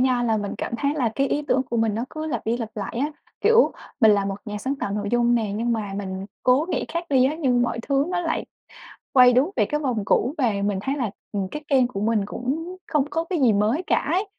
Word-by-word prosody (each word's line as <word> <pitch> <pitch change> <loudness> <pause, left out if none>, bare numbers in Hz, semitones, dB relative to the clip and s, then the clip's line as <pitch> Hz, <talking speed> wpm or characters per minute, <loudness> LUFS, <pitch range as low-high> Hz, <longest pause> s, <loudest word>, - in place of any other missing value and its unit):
nha 255 -1 +2
là 225 -2 +2
mình 205 -1 -3
cảm - - -4
thấy 285 +2 0
là 260 -6 +1
cái 275 +2 +1
ý 295 - 0
tưởng 260 - +3
của 235 - 0
mình 225 -2 +1
nó 230 +3 -2
cứ 310 0 -5
lặp 245 -9 -3
đi 230 +2 +1
lặp 230 -3 -4
lại 205 -3 -5
á. 295 +3 -1 0.3
Kiểu, 460 +1 +5 0.3
mình 220 -3 +7
là 200 -1 +2
một 195 0 -2
nhà 210 -2 -5
sáng 265 +6 -2
tạo 205 - -3
nội 205 0 -2
dung 240 0 +3
nè, 220 -4 0
nhưng 235 +2 0
mà 210 -3 -3
mình 190 -1 -5 0.2
cố 260 +5 +3
nghĩ - - -1
khác 335 +1 -3
đi 260 -2 +5
á, 275 +3 +1
nhưng 250 -4 +2
mọi 235 -1 -1
thứ 275 0 +3
nó 360 -1 -1
lại 330 -2 -1 0.7
quay 250 -1 +7
đúng 270 +9 +3
về 215 - +3
cái 300 +8 -1
vòng 245 -8 -1
cũ. 250 +6 +1
Và 245 -7 +2
mình 200 -2 0
thấy 270 +6 -1
là, 240 -8 -2 0.2
ừm, 200 -2 -2
cái 300 - -6
kênh 260 -3 +4
của 200 -5 -5
mình 210 -2 +1
cũng 320 - -4
không 300 -4 +1
có 325 - -1
cái 340 0 -2
gì 235 -4 +5
mới 215 - +1
cả - - +3 0.2
ấy. 380 +4 +1
245 Hz, 265 wpm, -23 LUFS, 215-285 Hz, 0.7 s, mình